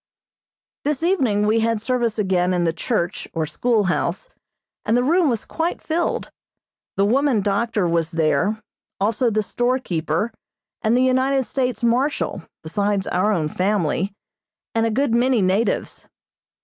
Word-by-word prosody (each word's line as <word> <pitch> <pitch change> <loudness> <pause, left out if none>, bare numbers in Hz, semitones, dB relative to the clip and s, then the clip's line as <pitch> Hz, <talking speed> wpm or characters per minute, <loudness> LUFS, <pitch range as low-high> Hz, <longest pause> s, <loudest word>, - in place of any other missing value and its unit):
This 295 +1 -1
evening 255 - +2
we 220 +2 +3
had 225 0 +1
service 235 -1 -1
again 185 -3 +1
in 175 - +1
the 165 -1 +1
church 170 0 -2
or 160 -1 0
schoolhouse, 220 - 0 0.5
and 225 +3 +2
the 245 - +2
room 330 +3 +3
was 230 -4 -2
quite 335 +1 -2
filled. 335 +2 -2 0.7
The 195 - +3
woman 255 0 +2
doctor 205 0 0
was 165 -1 0
there, 165 +5 +1 0.4
also 220 +4 +1
the 215 -1 0
storekeeper 225 -5 -1 0.5
and 225 +3 +2
the 255 - +3
United 260 +1 +2
States 250 -1 -2
Marshal, 245 -3 +1 0.2
besides 200 +3 -1
our 185 +4 +1
own 165 -7 0
family, 190 +1 0 0.6
and 225 0 +2
a - - +1
good 240 +2 0
many 245 +1 +3
natives. 195 +3 0
220 Hz, 140 wpm, -22 LUFS, 190-255 Hz, 0.7 s, we